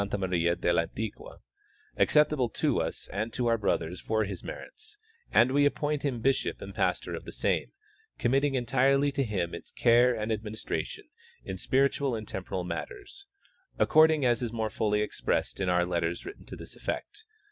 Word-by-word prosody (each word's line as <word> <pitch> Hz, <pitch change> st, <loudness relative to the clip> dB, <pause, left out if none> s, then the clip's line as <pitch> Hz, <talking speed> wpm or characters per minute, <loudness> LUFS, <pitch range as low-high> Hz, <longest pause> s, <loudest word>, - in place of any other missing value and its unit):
Maria 85 Hz, -3 st, +1 dB
del 85 Hz, 0 st, +1 dB
Antic^ua, 100 Hz, +6 st, -4 dB, 0.5 s
acceptable 150 Hz, -5 st, +3 dB
to -, -, +1 dB
us -, -, -4 dB
and 110 Hz, +4 st, -3 dB
to 125 Hz, -, -2 dB
our 115 Hz, -1 st, +3 dB
brothers 90 Hz, -3 st, -1 dB
for 110 Hz, 0 st, +1 dB
his 100 Hz, -3 st, -5 dB
merits, 435 Hz, -1 st, -9 dB, 0.3 s
and 120 Hz, +2 st, +5 dB
we 145 Hz, +1 st, +4 dB
appoint 145 Hz, 0 st, +1 dB
him 125 Hz, -6 st, -2 dB
bishoj) 135 Hz, 0 st, +1 dB
and -, -, -8 dB
pastor -, -, 0 dB
of -, -, -5 dB
the -, -, -8 dB
same, -, -, 0 dB, 0.5 s
committing 135 Hz, +3 st, +2 dB
entirely 135 Hz, +3 st, +3 dB
to 140 Hz, 0 st, 0 dB
him 95 Hz, -7 st, -2 dB
its 85 Hz, -, -8 dB
care 120 Hz, +1 st, +4 dB
and 110 Hz, 0 st, -2 dB
administration 110 Hz, 0 st, -4 dB, 0.4 s
in 95 Hz, -, -4 dB
spiritual 135 Hz, +4 st, +1 dB
and 110 Hz, -2 st, -6 dB
temporal 95 Hz, -1 st, -4 dB
matters, 395 Hz, -, -7 dB, 0.5 s
according 155 Hz, -2 st, +5 dB
as 120 Hz, -1 st, +3 dB
is 120 Hz, -2 st, -2 dB
more 110 Hz, -2 st, -2 dB
fully 105 Hz, -1 st, +1 dB
expressed 105 Hz, -, -1 dB
in 95 Hz, -2 st, 0 dB
our 90 Hz, 0 st, +3 dB
letters 85 Hz, -1 st, -2 dB
written 405 Hz, -, -10 dB
to -, -, -7 dB
this -, -, -9 dB
effect. 425 Hz, +1 st, -5 dB
115 Hz, 170 wpm, -29 LUFS, 95-140 Hz, 0.5 s, and